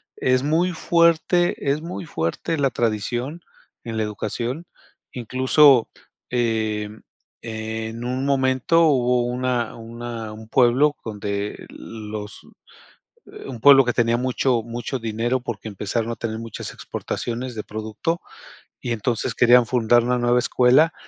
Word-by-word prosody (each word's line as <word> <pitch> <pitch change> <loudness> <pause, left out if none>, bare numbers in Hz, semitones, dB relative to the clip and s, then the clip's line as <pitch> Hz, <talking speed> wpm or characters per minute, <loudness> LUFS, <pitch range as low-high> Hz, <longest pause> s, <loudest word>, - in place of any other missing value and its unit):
es 130 0 +1
muy 165 +5 +2
fuerte, 170 -1 +2
es 150 +2 -1
muy 170 +2 -6
fuerte 120 - -2
la 140 -2 +2
tradición 120 +7 -2 0.4
en 115 -1 -5
la 110 - +1
educación, 115 - -4 0.5
incluso, 130 +1 +4 0.4
em, 110 -3 -1 0.4
en 110 0 -5
un 130 +2 -2
momento 130 +3 +2
hubo 125 -4 +2
una 125 -1 -1
una 115 -1 -7
un 110 +1 -11
pueblo 130 +5 +3
donde 105 -1 -4
los 105 -2 -8 0.8
eh, - - -12
un 125 -3 -7
pueblo 135 +2 +8
que 120 - 0
tenía 120 -1 +2
mucho 125 0 +1
mucho 120 +3 -4
dinero 115 +3 -1
porque 115 -3 -6
empezaron 110 +3 -3
a - - -3
tener 110 -1 -4
muchas 115 -2 -7
exportaciones 120 +2 -5
de 105 - -4
producto. 110 +11 -3 0.6
Y 120 - -3
entonces, 115 +1 -1
querían 120 0 +6
fundar 120 0 +3
una 125 0 +1
nueva 120 0 +2
escuela, 130 +6 +4
120 Hz, 130 wpm, -22 LUFS, 110-130 Hz, 0.8 s, pueblo